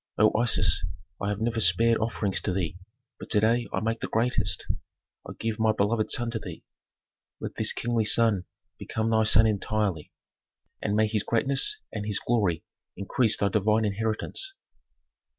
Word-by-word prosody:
O 110 +1 +3
Isis, 120 +1 +2 0.4
I 100 - -1
have 105 +1 -3
never 115 0 -1
spared 110 +5 +5
offerings 110 -3 -1
to 100 - -2
thee, 90 -4 -2 0.4
but - - -10
to 105 - +5
day 115 +3 +1
I - - -2
make 115 +1 -2
the - - -4
greatest; 110 -3 0 0.6
I - - -6
give 115 -1 -3
my 110 0 +3
beloved 110 +1 0
son 120 -1 0
to 115 - -2
thee. 90 -6 -9 0.8
Let - - -6
this - - +4
kingly 115 -2 -1
son 105 -4 +3 0.3
become 110 +1 -2
thy 110 0 +3
son 110 +1 +5
entirely, 105 -5 -1 0.7
and 105 -1 -1
may 110 +1 +3
his 105 -1 -1
greatness 135 - +1 0.2
and 105 -1 -4
his 105 - 0
glory 100 -9 0 0.3
increase 110 +4 +1
thy 100 - +1
divine 105 +2 +1
inheritance." 110 - -3
110 Hz, 165 wpm, -26 LUFS, 105-115 Hz, 0.8 s, spared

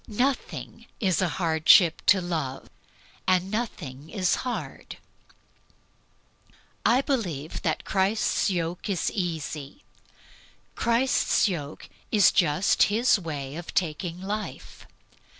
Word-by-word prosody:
Nothing 250 +5 -2
is 190 -4 +1
a 185 - +2
hardship 165 0 +4
to 195 -2 +6
Love, 155 -7 -4 0.6
and 185 +1 +2
nothing 160 - -5
is 185 -4 +1
hard. 250 -2 -6 1.9
I 250 +3 +4
believe 175 - -3
that 160 - -2
Christ's 195 +3 +1
"yoke" 175 0 -3
is 190 -4 0
easy. 160 - -4 0.9
Christ's 235 0 +2
yoke 155 -6 -5 0.2
is 210 -3 +5
just 170 +1 +2
His 225 +1 +3
way 145 -5 -5
of 170 +1 -8
taking 170 0 -1
life. 205 +3 -6
180 Hz, 100 wpm, -26 LUFS, 160-210 Hz, 1.9 s, to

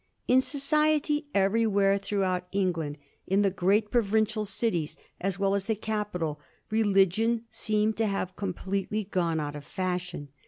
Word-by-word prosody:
In 255 +1 +5
society 295 +2 +1
everywhere 200 0 +3
throughout 190 -3 -1
England, 170 -7 -1 0.3
in 195 +2 +3
the 195 - +3
great 205 +3 +1
provincial 215 -1 +2
cities 190 -6 -1 0.2
as 195 0 -1
well 195 0 +1
as 200 -1 0
in 220 - 0
the - - -21
capital, 205 -9 -2 0.3
religion 220 +2 +3
seemed 215 0 0
to 225 -1 +2
have 185 -2 -2
completely 195 +2 -2
gone 175 -5 0
out 145 -1 -3
of 145 - -7
fashion. 180 -3 -3
200 Hz, 145 wpm, -28 LUFS, 185-220 Hz, 0.3 s, In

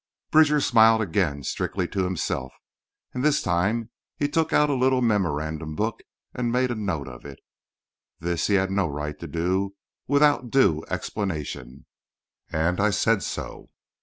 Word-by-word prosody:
Bridger 150 -1 +5
smiled 115 -5 +5
again—strictly 90 -2 -1
to 95 -2 -1
himself—and 90 - -6
this 150 0 +3
time 105 +6 0 0.3
he 145 - +1
took 160 +2 0
out 150 -1 +3
a - - +2
little 130 0 +2
memorandum 80 -7 -1
book 110 +5 -2 0.3
and 120 -1 -1
made 125 +1 +1
a - - -2
note 95 -10 -3
of 60 -2 -10
it. 70 -2 -10 0.8
This 85 0 -1
he 100 - +3
had 95 0 +1
no 95 -2 +1
right 75 0 -5
to - - -7
do 90 +5 -1 0.3
without 145 -2 +3
due 100 - +3
explanation, 75 - -4 0.6
and 85 +4 0
I 105 +1 +3
said 105 +1 +2
so. - - -6
100 Hz, 145 wpm, -25 LUFS, 80-120 Hz, 0.8 s, Bridger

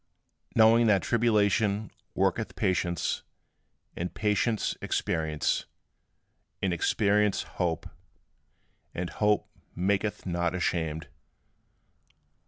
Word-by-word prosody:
Knowing 115 +1 +6
that 100 -3 +3
tribulation 110 -2 +2 0.2
worketh - - 0
patience, 85 -2 0 0.7
and 90 +1 -4
patience 105 +1 0
experience, 80 -1 -1 0.9
and 95 -2 0
experience 105 +4 +2
hope; 85 -3 -2 1.1
and 90 0 -3
hope 105 -1 +1 0.3
maketh 100 +3 0
not 85 -1 -1
ashamed. 80 -3 -1
100 Hz, 75 wpm, -28 LUFS, 85-105 Hz, 1.1 s, Knowing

